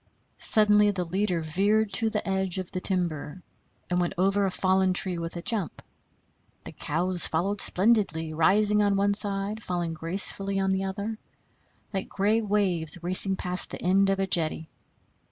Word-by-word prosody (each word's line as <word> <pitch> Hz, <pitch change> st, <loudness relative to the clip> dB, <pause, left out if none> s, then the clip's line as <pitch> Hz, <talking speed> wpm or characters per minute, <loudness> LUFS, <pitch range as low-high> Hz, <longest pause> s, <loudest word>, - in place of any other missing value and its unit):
Suddenly 210 Hz, -1 st, +5 dB
the 190 Hz, -3 st, -2 dB
leader 185 Hz, 0 st, -1 dB
veered 200 Hz, +7 st, 0 dB
in -, -, -23 dB
to 220 Hz, +3 st, +2 dB
the 215 Hz, -2 st, -3 dB
edge 190 Hz, -1 st, -2 dB
of 185 Hz, -1 st, -6 dB
the 185 Hz, -, -5 dB
timber 175 Hz, -3 st, -2 dB, 0.4 s
and 180 Hz, 0 st, -1 dB
went 175 Hz, -, -2 dB
over 195 Hz, +2 st, +1 dB
a -, -, 0 dB
fallen 185 Hz, 0 st, +1 dB
tree 180 Hz, -2 st, -1 dB
with 165 Hz, +1 st, -6 dB
a 170 Hz, -, -7 dB
jump; 210 Hz, -, -3 dB, 0.8 s
the -, -, -9 dB
cows 175 Hz, +4 st, +1 dB
followed 195 Hz, +5 st, -1 dB
splendidly, 190 Hz, -6 st, 0 dB
rising 205 Hz, +6 st, +2 dB
on 200 Hz, -1 st, +1 dB
one 200 Hz, +1 st, +1 dB
side, 200 Hz, +1 st, 0 dB
falling 175 Hz, -4 st, -3 dB
gracefully 195 Hz, +4 st, -1 dB
on 195 Hz, 0 st, 0 dB
the 190 Hz, 0 st, -1 dB
other, 205 Hz, +3 st, -5 dB, 0.7 s
like 190 Hz, -1 st, -4 dB
gray 210 Hz, +3 st, 0 dB
waves 190 Hz, -7 st, 0 dB
racing 185 Hz, +2 st, +3 dB
past 180 Hz, 0 st, -2 dB
the -, -, -8 dB
end 195 Hz, +2 st, +2 dB
of 195 Hz, 0 st, 0 dB
a 195 Hz, -, +1 dB
jetty. 160 Hz, -3 st, 0 dB
190 Hz, 170 wpm, -26 LUFS, 175-205 Hz, 0.8 s, Suddenly